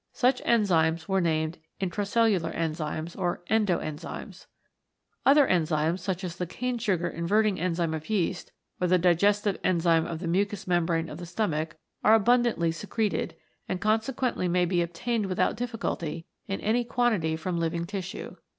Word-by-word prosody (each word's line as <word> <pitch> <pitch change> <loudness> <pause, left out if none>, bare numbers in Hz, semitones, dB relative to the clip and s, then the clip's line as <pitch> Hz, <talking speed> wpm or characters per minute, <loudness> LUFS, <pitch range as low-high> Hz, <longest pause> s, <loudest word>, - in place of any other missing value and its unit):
Such 250 0 +2
enzymes 165 -8 +2
were 195 -1 +2
named 160 -1 0 0.2
Intracelhdar 195 -2 +1
Enzymes 155 0 -3
or 175 -2 -2
Endo 210 -6 +3
Enzymes. 155 -1 -7 0.8
Other 285 +1 +7
enzymes, 160 0 +1
such 185 +1 -3
as 170 -2 -5
the 180 - -3
cane 250 +6 -3
sugar 185 -7 0
inverting 200 +5 +1
enzyme 170 -2 0
of 160 +3 -6
yeast, 185 -4 -1 0.3
or 180 - +3
the 180 +1 +4
digestive 200 +3 +2
enzyme 165 -2 +3
of 165 - -4
the 170 +1 -5
mucous 200 +3 0
membrane 170 -2 +1
of 155 +1 -8
the 175 - -7
stomach 165 -4 -2 0.3
are 220 - +7
abundantly 225 -6 +3
secreted 210 +5 -2 0.3
and 185 - -1
conse 220 +4 +1
quently 235 -8 0
may 180 0 +3
be 175 0 +1
obtained 200 +6 -1
without 185 -1 +1
difficulty 215 -9 -3 0.2
in 195 - -2
any 235 +3 +2
quantity 225 -10 +1
from 170 +2 -3
living 170 0 -1
tissue. 190 0 -6
180 Hz, 155 wpm, -27 LUFS, 165-210 Hz, 0.8 s, Other